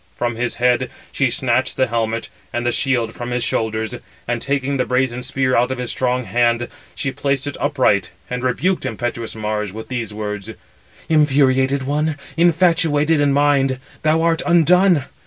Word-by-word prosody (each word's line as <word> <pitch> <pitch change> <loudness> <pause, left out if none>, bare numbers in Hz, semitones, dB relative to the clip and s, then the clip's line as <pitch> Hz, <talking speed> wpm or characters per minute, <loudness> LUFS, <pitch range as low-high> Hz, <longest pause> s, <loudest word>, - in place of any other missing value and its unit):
From 120 -1 -1
his 120 +1 -2
head 125 0 +2 0.2
she 135 -2 +1
snatched 125 +1 0
the 130 - +3
helmet, 115 -1 -2 0.2
and 120 0 -2
the 120 - +2
shield 120 -4 0
from 120 0 -6
his 125 -1 -1
shoulders, 110 -2 -1 0.3
and 120 -1 -1
taking 140 0 -1
the 125 - +1
brazen 125 -1 0
spear 130 0 0
out 120 +1 +3
of 130 - -2
his 125 -1 -3
strong 125 0 0
hand, 120 0 +1 0.3
she 135 - -2
placed 140 -1 -1
it 145 - -4
upright; 130 -10 +2 0.2
and 125 0 -4
rebuked 180 +9 0
impetuous 120 -2 -4
Mars 105 -2 -2
with 110 +2 -9
[these] 120 -4 -3
words: 105 -1 -5 0.6
"Infuriated 135 -3 +3
one, 150 +2 -1 0.2
infatuated 165 -3 +3
in 145 -1 +3
mind, 140 -2 +2 0.2
thou 155 +1 +2
art 165 -1 +2
undone! 175 -2 +4
130 Hz, 165 wpm, -19 LUFS, 120-145 Hz, 0.6 s, undone